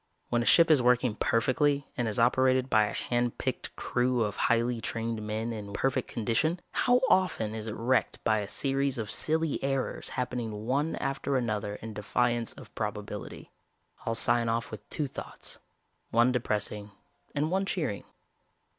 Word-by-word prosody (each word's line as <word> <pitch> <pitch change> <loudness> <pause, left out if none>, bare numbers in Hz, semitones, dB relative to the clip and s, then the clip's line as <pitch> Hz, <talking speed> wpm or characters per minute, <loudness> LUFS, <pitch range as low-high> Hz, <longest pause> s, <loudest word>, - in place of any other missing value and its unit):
When 120 - +2
a - - -1
ship 165 +4 +6
is 145 -4 +6
working 125 -1 +3
perfectly 140 +6 +1
and 120 -4 -1
is 110 - -1
operated 130 +2 +3
by 110 -2 +5
a - - -4
hand 120 -1 -1
picked - - -3
crew 125 -1 +1
of 105 - -2
highly 120 0 +1
trained 115 -1 -3
men 110 +2 -3
in 105 -2 -7
perfect 130 +1 0
condition, 120 +10 0
how 250 0 +3
often 180 - +2
is 110 0 -5
it 110 - -4
wrecked 125 +3 +1
by 110 - +3
a 100 - -4
series 135 +2 0
of 110 -3 -3
silly 160 -2 0
errors 135 -1 -1
happening 115 -4 -3
one 140 +6 0
after 135 0 -1
another 105 -4 -2
in 110 +1 -8
defiance 120 +3 0
of - - -13
probability? - - -5 0.5
"I'll 115 - -1
sign 120 0 +2
off 115 +1 -1
with 110 - -9
two 150 - -1
thoughts, - - -6 0.5
one 120 +2 +4
depressing 105 -3 -1 0.5
and 150 +3 0
one 195 +1 +1
cheering. 170 - -2
120 Hz, 165 wpm, -29 LUFS, 110-135 Hz, 0.5 s, ship